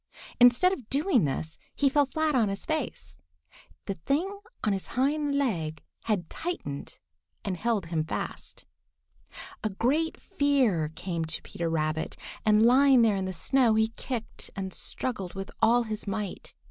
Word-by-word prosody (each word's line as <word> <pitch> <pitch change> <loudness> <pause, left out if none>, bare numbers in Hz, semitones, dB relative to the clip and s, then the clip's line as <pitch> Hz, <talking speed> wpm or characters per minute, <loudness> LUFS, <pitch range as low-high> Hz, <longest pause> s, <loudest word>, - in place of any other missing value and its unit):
Instead 245 +10 +6
of 255 - -7
doing 285 - +3
this, 155 +3 -3 0.2
he 285 - +3
fell 285 +1 +3
flat 315 +3 0
on 230 -6 +3
his 195 0 -4
face. 85 - -3 0.7
The 195 - -2
thing 375 +8 0 0.2
on 210 - +2
his 195 - -3
hind 285 +2 +1
leg 165 - -1 0.2
had 200 -7 0
tightened 235 - -5 0.5
and 190 - -1
held 215 -1 0
him 165 -1 -1
fast. 160 - -5 1.0
A 215 - +1
great 275 +11 0
fear 270 - +2
came 170 -1 -3
to 160 0 -4
Peter 170 -1 -3
Rabbit, 160 -1 -1 0.3
and 215 +1 +5
lying 260 0 +6
there 215 -3 +4
in 190 -1 -1
the 185 - -2
snow, 235 +6 +3
he 220 0 +3
kicked 230 0 -5
and 190 -2 -4
struggled 195 -8 -4
with 195 +1 -5
all 240 +2 +5
his 215 -2 -5
might. 200 -1 -4
220 Hz, 155 wpm, -28 LUFS, 185-275 Hz, 1.0 s, Instead